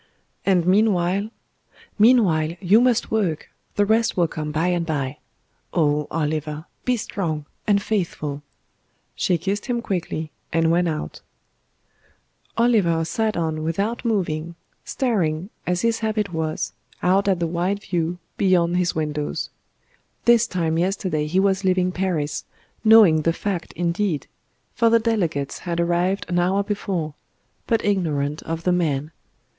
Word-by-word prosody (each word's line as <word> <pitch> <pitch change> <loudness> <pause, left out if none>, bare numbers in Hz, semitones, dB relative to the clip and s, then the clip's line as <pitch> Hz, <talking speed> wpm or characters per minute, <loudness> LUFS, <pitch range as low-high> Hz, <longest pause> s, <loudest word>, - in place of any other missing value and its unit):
"And 180 -3 +3
meanwhile 195 0 +2 0.3
" - - -28
"Meanwhile, 185 -9 +4
you 205 +4 +5
must 245 -2 +2
work; 190 -8 -1 0.2
the 205 - +3
rest 225 +1 +2
will 175 -2 +3
come 155 -1 -4
by 160 +4 +1
and 175 -1 +1
bye. 145 -4 -3 0.6
Oh! 150 -3 +2
Oliver, 155 0 -2 0.2
be 250 -1 +2
strong 160 -8 -3 0.2
and 205 -1 +4
faithful." 170 -9 -2 0.7
She 180 - +1
kissed 195 - -3
him 245 -2 0
quickly, 170 -7 -3 0.2
and 165 0 +2
went 175 +1 +2
out. 155 -2 -4 1.4
Oliver 200 -9 +3
sat 220 +3 -1
on 160 -2 -1
without 195 +9 -1
moving, 170 -7 -1 0.3
staring, 190 - -1 0.2
as 180 0 0
his 230 -1 +2
habit 215 -4 -1
was, 160 -1 -2 0.3
out 190 +3 +3
at 190 -3 +2
the 170 - 0
wide 180 +5 -1
view 175 -1 -1 0.2
beyond 180 -3 +3
his 180 -1 +1
windows. 150 -1 -2 0.7
This 235 0 +5
time 165 -5 0
yesterday 180 -4 0
he 180 +5 +1
was 195 0 +2
leaving 185 -1 +2
Paris, 170 -6 -1 0.4
knowing 215 -8 +7
the 165 +2 +1
fact 185 -2 -3
indeed 175 -1 -1 0.5
for 230 -1 +3
the 230 - +6
delegates 180 - -1
had 170 -1 -3
arrived 175 +3 +1
an 175 0 0
hour 190 +3 +2
before 195 -7 -3 0.5
but 225 - +1
ignorant 155 -7 0
of 165 0 -4
the 180 - +2
Man. 155 -4 0
175 Hz, 140 wpm, -23 LUFS, 160-205 Hz, 1.4 s, knowing